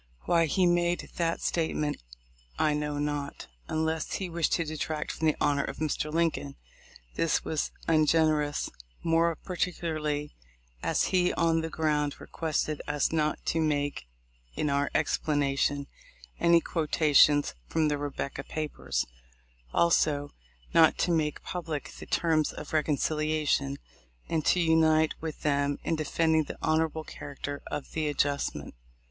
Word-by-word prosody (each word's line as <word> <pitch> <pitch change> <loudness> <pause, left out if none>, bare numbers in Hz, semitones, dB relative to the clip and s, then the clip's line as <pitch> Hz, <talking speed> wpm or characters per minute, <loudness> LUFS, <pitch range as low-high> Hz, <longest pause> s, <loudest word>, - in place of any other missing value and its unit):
Why 165 -1 +3
he 185 +5 +2
made 175 0 +1
that 165 -1 0
state 165 -2 0
ment 150 -1 -2 0.6
I 150 - +2
know 150 0 -2
not, 145 -1 -3 0.2
unless 160 0 -1
he 185 -3 -3
wished 165 -2 +1
to 165 - +2
detract 155 0 -3
from 160 - -1
the 155 - +3
honor 140 -1 +2
of - - -5
Mr. 155 0 -1
Lincoln. 160 - 0 0.6
This 165 - +1
was 155 -2 -1 0.2
ungenerous, 155 -2 +2 0.3
more 165 0 +3
particularly 155 -5 -2 0.5
as - - +1
he 180 -1 +4
on 165 -1 +2
the 160 - -3
ground 150 -3 0
requested 155 -2 -2
us 145 0 +1
not 155 -2 0
to 165 - +1
make 145 - -1 0.5
in 150 - 0
our 140 0 +1
explanation 145 -2 +1 0.5
any 170 0 +5
quotations 150 -3 +3
from 160 -1 +1
the 145 -1 0
"Rebecca 140 -1 -4
papers 140 - -3 0.3
;" - - -33
also, 150 -4 +2 0.4
not 160 -1 +6
to 175 - +1
make 155 -3 0
public 165 -5 -4
the - - -9
terms 160 -3 +2
of - - -9
reconciliation, 155 -2 +1 0.5
and 160 -2 0
to 180 - +4
unite 160 -1 +4
with 160 -1 -5
them 145 -1 +1
in 165 - 0
defending 160 +1 +1
the - - -7
honorable 160 0 +1
character 145 -1 -7
of 150 - -5
the 155 -1 -1
adjustment. 145 -1 -1
155 Hz, 140 wpm, -29 LUFS, 145-165 Hz, 0.6 s, not